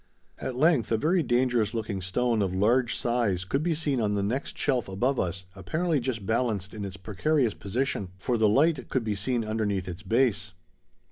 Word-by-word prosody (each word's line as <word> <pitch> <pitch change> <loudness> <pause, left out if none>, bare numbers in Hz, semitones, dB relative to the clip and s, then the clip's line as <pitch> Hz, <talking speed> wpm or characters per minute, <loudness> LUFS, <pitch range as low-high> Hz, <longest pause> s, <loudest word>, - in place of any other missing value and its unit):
At 130 - -4
length 145 -3 +3
a 115 - +3
very 170 +9 +2
dangerous 120 -4 +1
looking 110 -4 -3
stone 115 +5 0
of 95 -2 -1
large 120 +5 +2
size 115 -7 0
could 135 +9 0
be 165 0 0
seen 145 -5 0
on 105 -1 +1
the 100 - 0
next 125 +7 -2
shelf 125 -8 0
above 125 +8 0
us 90 +1 -2
apparently 155 - 0
just 120 -5 -3
balanced 110 -3 0
in 105 -2 -5
its 100 0 -6
precarious 115 +5 0
position, 105 -1 -2
for 120 +6 -1
the 110 -1 +4
light 140 +3 +2
could 130 - 0
be 110 -2 -1
seen 115 +4 -1
underneath 105 -4 -1
its 90 0 -6
base. 105 -3 +1
115 Hz, 190 wpm, -27 LUFS, 100-130 Hz, -, the